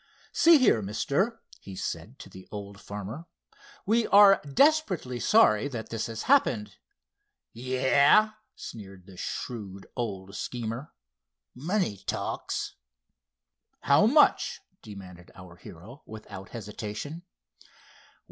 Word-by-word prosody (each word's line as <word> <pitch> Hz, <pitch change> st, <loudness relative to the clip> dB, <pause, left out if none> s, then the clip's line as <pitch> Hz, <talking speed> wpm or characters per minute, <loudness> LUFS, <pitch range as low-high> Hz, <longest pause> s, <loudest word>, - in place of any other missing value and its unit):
"See 330 Hz, -1 st, +6 dB
here, 250 Hz, -, +3 dB
mister," 140 Hz, -, -1 dB, 0.2 s
he 95 Hz, -, -10 dB
said 90 Hz, +8 st, -6 dB
to -, -, -11 dB
the 95 Hz, -, -14 dB
old 100 Hz, -1 st, -8 dB
farmer; 105 Hz, -, -7 dB, 0.6 s
"we 225 Hz, +3 st, +2 dB
are 200 Hz, -1 st, +7 dB
desperately 190 Hz, -, +2 dB
sorry 140 Hz, -, +4 dB
that 115 Hz, -5 st, -6 dB
this 115 Hz, -1 st, -3 dB
has 115 Hz, -1 st, -6 dB
happened." 110 Hz, -, +2 dB, 0.8 s
"Yah!" 130 Hz, -, +3 dB, 0.2 s
sneered 95 Hz, -4 st, -10 dB
the 95 Hz, -1 st, -14 dB
shrewd 100 Hz, -1 st, -6 dB
old 100 Hz, -5 st, -5 dB
schemer—"money 110 Hz, -, -5 dB
talks." -, -, -3 dB, 1.1 s
"How 145 Hz, +8 st, +4 dB
much?" 295 Hz, +5 st, +3 dB, 0.2 s
demanded 95 Hz, -5 st, -12 dB
our 90 Hz, -2 st, -13 dB
hero, 100 Hz, -, -13 dB
without 105 Hz, -3 st, -10 dB
hesitation. 110 Hz, -, -7 dB
110 Hz, 100 wpm, -27 LUFS, 95-150 Hz, 1.1 s, are